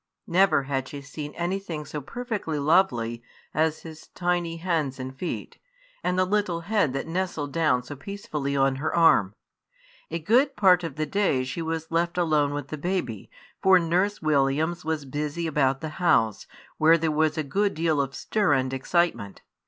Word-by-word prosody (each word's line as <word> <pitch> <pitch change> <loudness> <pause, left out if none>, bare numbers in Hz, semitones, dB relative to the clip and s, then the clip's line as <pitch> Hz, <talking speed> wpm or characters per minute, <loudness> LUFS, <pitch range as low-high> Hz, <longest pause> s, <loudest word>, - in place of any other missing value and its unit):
Never 170 -5 +3
had 135 -1 -2
she 145 - -7
seen 145 +1 -7
anything 175 -3 -3
so 150 +1 -5
perfectly 215 - -4
lovely 140 -7 +2 0.3
as 160 +1 +1
his 160 -1 -11
tiny 175 -2 -1
hands 160 -6 -1
and 130 +1 -6
feet, 175 +6 -5 0.4
and 180 - 0
the 185 - +3
little 185 -3 0
head 195 -6 +1
that 135 - -3
nestled 165 -4 -3
down 155 -7 +2
so 145 +3 -8
peacefully 150 - -4
on 135 -1 +2
her 150 +3 -2
arm. 105 - +4 0.7
A 165 - -2
good 245 - +2
part 180 -3 +5
of 165 -5 -5
the 155 - -1
day 185 -7 +1
she 130 +6 -4
was 160 0 -4
left 170 +1 0
alone 155 -4 +2
with 145 -1 -5
the 155 - -5
baby, 145 - -3 0.3
for 190 -1 +6
Nurse 180 +3 0
Williams 155 +3 +1
was 155 -2 -2
busy 150 +4 -3
about 135 -4 +1
the 155 - -4
house, 115 - +2 0.3
where 160 +2 +6
there 160 -1 0
was 155 +1 +1
a 155 - 0
good 200 +8 0
deal 160 -2 +1
of 135 -1 -4
stir 205 -8 +1
and 130 -1 0
excitement. 135 - -1
160 Hz, 175 wpm, -26 LUFS, 140-175 Hz, 0.7 s, for